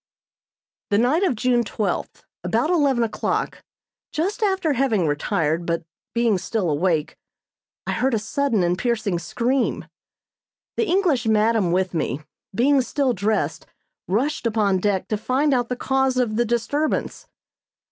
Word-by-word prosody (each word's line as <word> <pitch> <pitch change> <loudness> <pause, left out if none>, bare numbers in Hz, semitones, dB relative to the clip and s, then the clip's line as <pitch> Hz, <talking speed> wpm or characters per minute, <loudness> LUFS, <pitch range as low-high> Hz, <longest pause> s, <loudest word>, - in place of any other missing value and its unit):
The 205 - +3
night 255 - +3
of 365 -10 +2
June 240 +1 +2
twelfth, 210 -1 -3 0.2
about 315 - +1
eleven 280 -8 +3
o'clock, 225 - -2 0.5
just 370 +9 -2
after 380 -7 +1
having 235 -9 +1
retired, 160 +2 0
but 170 0 -2 0.3
being 230 -5 +2
still 190 -4 -1
awake, 155 0 0 0.7
I - - -2
heard 260 -1 +1
a - - +2
sudden 230 -1 0
and 175 0 +2
piercing 215 -7 0
scream. 250 +7 -1 0.9
The 455 - 0
English 335 - +2
madam 215 -3 +3
with 185 0 0
me, 155 -3 -2 0.3
being 270 +5 +4
still 265 0 0
dressed, 210 +1 -1 0.4
rushed 240 +7 0
upon 210 -4 +1
deck 195 -1 0
to 215 - 0
find 270 +6 +1
out 245 -2 0
the 250 - -1
cause 265 0 +1
of 240 -4 +1
the 240 +2 +2
disturbance. 285 - -1
235 Hz, 140 wpm, -23 LUFS, 200-270 Hz, 0.9 s, being